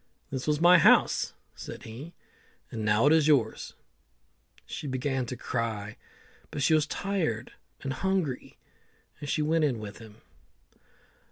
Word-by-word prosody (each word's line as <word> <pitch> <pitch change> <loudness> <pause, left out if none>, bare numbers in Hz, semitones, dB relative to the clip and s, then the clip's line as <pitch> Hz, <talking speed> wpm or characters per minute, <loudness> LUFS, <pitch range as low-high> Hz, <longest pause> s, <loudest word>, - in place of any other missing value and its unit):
"This 130 0 -4
was 150 -1 +2
my 175 +1 +7
house," - - +4 0.2
said - - -9
he, 130 +10 -9 0.6
"and 110 - -4
now 105 +3 +3
it's 155 0 +5
yours." 125 -8 +1 0.9
She 150 - -6
began 130 -1 -1
to 125 - -5
cry, 110 -4 -3 0.5
but 145 - -3
she 160 - +4
was 155 -1 +3
tired 160 - -2 0.3
and 135 -1 -2
hungry, 180 -4 -2 0.6
and 145 -1 -6
she 150 - +1
went 160 +1 +2
in 135 -6 +1
with 105 -1 -8
him. 110 -1 -14
135 Hz, 140 wpm, -28 LUFS, 115-155 Hz, 0.9 s, my